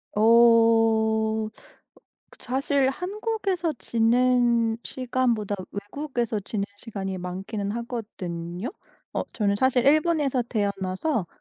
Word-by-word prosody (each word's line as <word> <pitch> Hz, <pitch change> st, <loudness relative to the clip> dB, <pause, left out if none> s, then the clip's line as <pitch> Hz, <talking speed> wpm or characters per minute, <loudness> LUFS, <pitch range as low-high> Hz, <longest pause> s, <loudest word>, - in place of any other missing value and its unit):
어. 210 Hz, -, +1 dB
어 225 Hz, -1 st, +4 dB, 0.8 s
그 -, -, -17 dB
사실 270 Hz, +1 st, +1 dB
한국에서 385 Hz, -, -2 dB
지낸 235 Hz, -1 st, +2 dB
시간보다 240 Hz, -5 st, -1 dB, 0.2 s
외국에서 235 Hz, +2 st, -3 dB
지낸 200 Hz, 0 st, -3 dB
시간이 195 Hz, -3 st, -5 dB
많기는 195 Hz, +3 st, -4 dB
하거든요? 205 Hz, -, -5 dB, 0.4 s
어 -, -, 0 dB
저는 200 Hz, -2 st, +1 dB
사실 260 Hz, +1 st, +2 dB
일본에서 295 Hz, -4 st, +3 dB
태어나서 200 Hz, -, -1 dB
230 Hz, 230 characters per minute, -25 LUFS, 205-260 Hz, 0.8 s, 어